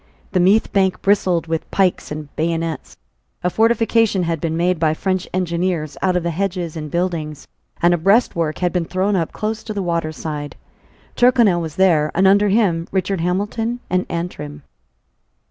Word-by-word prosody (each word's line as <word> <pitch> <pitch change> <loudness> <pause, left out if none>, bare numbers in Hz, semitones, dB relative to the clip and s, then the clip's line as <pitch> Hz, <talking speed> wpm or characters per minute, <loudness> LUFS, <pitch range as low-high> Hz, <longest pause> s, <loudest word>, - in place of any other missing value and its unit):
The 185 - +1
Meath 195 +5 +3
bank 190 -2 +2
bristled 185 -4 +2
with 165 -1 -3
pikes 190 -2 +1
and 150 -1 -7
bayonets. 165 0 -3 0.5
A 180 - +1
fortification 225 -3 +2
had 165 -2 -2
been 165 -1 -1
made 175 0 +1
by 155 -1 +2
French 185 +1 -1
engineers 170 -3 -1
out 185 -1 +1
of 175 - -2
the 170 - -1
hedges 175 -2 -3
and 155 -1 -5
buildings; 165 -3 -3 0.4
and 175 0 +5
a 175 - 0
breastwork 170 -4 +2
had 180 -1 -1
been 175 -2 0
thrown 190 +4 0
up 165 -3 -1
close 215 +1 -3
to 215 - -6
the 200 - -2
water 170 -2 -1
side, 150 -2 -6 0.6
Tyrconnel 235 -8 +4
was 160 -2 -6
there; 165 -5 +3
and 190 +3 +3
under 200 +1 +4
him 190 -6 +2
were - - -10
Richard 190 -1 -1
Hamilton 210 +7 -1
and 185 0 +1
Antrim. 150 -4 -5
180 Hz, 175 wpm, -20 LUFS, 165-195 Hz, 0.6 s, and